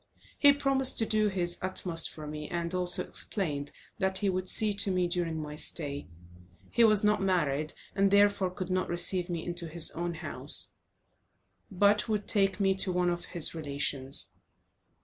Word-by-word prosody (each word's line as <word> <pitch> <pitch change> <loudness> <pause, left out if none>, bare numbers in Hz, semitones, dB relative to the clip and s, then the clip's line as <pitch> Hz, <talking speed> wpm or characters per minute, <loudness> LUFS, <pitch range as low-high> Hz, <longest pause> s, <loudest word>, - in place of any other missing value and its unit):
He 285 - +7
promised 275 -2 +2
to 225 - +3
do 215 -1 +1
his 180 -3 -1
utmost 180 -3 +1
for 155 - -10
me, 150 0 -7
and 170 0 -4
also 180 -1 +4
explained 145 -7 -2 0.3
that 190 -1 0
he 200 -1 0
would 185 0 -3
see 215 -1 +2
to 200 0 +1
me 180 -1 0
during 170 -2 -3
my 150 -1 -7
stay; 145 -2 -1 0.7
he 235 - +4
was 215 -2 +4
not 210 -1 +2
married, 155 -6 -1 0.2
and 195 0 +2
therefore 200 -1 +3
could 185 0 -7
not 185 0 -1
receive 175 +1 +2
me 170 -2 -4
into 175 -1 -5
his 165 0 +2
own 170 0 -4
house, - - 0 1.0
but 205 +3 +1
would 210 -2 -2
take 195 -2 +2
me 195 -1 +2
to 190 - +2
one 180 0 0
of 175 0 -5
his 170 -4 -2
relations. 140 -3 -1
180 Hz, 170 wpm, -29 LUFS, 165-200 Hz, 1.0 s, He